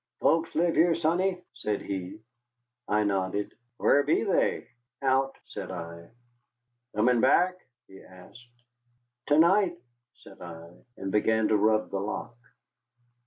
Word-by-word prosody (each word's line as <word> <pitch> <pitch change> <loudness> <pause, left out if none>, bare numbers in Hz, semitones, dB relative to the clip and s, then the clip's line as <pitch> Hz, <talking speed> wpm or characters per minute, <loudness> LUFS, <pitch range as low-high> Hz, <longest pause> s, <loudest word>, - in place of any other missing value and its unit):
"Folks 165 0 +2
live 170 +1 +2
here, 165 0 +4
sonny?" 180 +3 0
said 105 -3 -3
he. 95 +1 -6 0.7
I 105 +1 +2
nodded. 100 0 -1 0.2
"Whar 145 - +4
be 145 +8 +1
they?" 200 - +1 0.4
"Out," 135 0 +1
said - - -7
I. 85 -2 -8 0.9
"Comin' 115 +2 +3
back?" 180 +7 +4 0.3
he 95 - -15
asked. 120 +6 -17 0.6
"To 145 - +3
night," 175 +2 +4 0.5
said 95 - -15
I, 85 -1 -10 0.3
and 95 0 -5
began 110 +1 +2
to 110 - +3
rub 110 +1 +2
the 100 - -2
lock. 105 +4 -5
110 Hz, 125 wpm, -27 LUFS, 95-160 Hz, 0.9 s, here